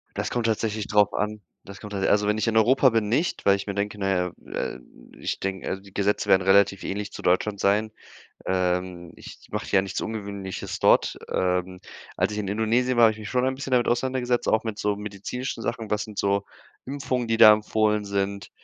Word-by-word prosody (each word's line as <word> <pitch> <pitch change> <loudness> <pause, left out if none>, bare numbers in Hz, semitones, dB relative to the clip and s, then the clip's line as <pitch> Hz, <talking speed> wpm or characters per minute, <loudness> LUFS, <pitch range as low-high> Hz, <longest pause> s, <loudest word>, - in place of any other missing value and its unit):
Das - - -2
kommt 120 -2 -1
tatsächlich 110 -1 -1
drauf 105 -1 +3
an. 105 0 -2 0.2
Das 100 0 -11
kommt 105 -1 -9
also, 100 +1 +1
wenn 105 +1 +1
ich 110 - 0
in 110 0 0
Europa 130 +5 +5
bin 115 -3 0
nicht, 155 +9 0
weil 100 0 +5
ich 100 - -7
mir 100 - -3
denke, 105 +1 -3
na 95 -1 -1
ja, 90 -2 0 0.2
äh, - - -3 0.4
ich - - -3
denke 95 -1 -4
also, 95 +1 -4
die 100 - -16
Gesetze 100 +1 0
werden 95 - +6
relativ 100 +1 +3
ähnlich 100 +1 -4
zu - - -8
Deutschland 100 +3 +1
sein. 105 +2 +1 0.5
Ähm, 90 -1 -1
ich - - -11
mache - - -4
ja 95 - +5
nichts 95 -1 -4
Ungewöhnliches 100 -3 -5
dort. - - +3 0.2
Ähm, 90 0 -1 0.4
als - - +1
ich 105 - -4
in 100 -2 -3
Indonesien 115 +4 +1
war, 120 - +8
habe 110 - +6
ich 110 - -12
mich 110 0 -7
schon 125 0 +1
ein 130 - 0
bisschen 135 0 -6
damit 125 -1 +2
auseinandergesetzt, 125 0 0
auch 110 - +3
mit 110 -2 -4
so 105 -1 0
medizinischen 105 +4 -5
Sachen. 110 -2 -4
Was 105 0 0
sind 105 -2 -11
so 100 0 +1 0.4
Impfungen, 130 -3 -3
die 115 - +2
da 110 -2 +10
empfohlen 105 0 +1
sind. 100 0 -3
105 Hz, 210 wpm, -25 LUFS, 100-115 Hz, 0.5 s, da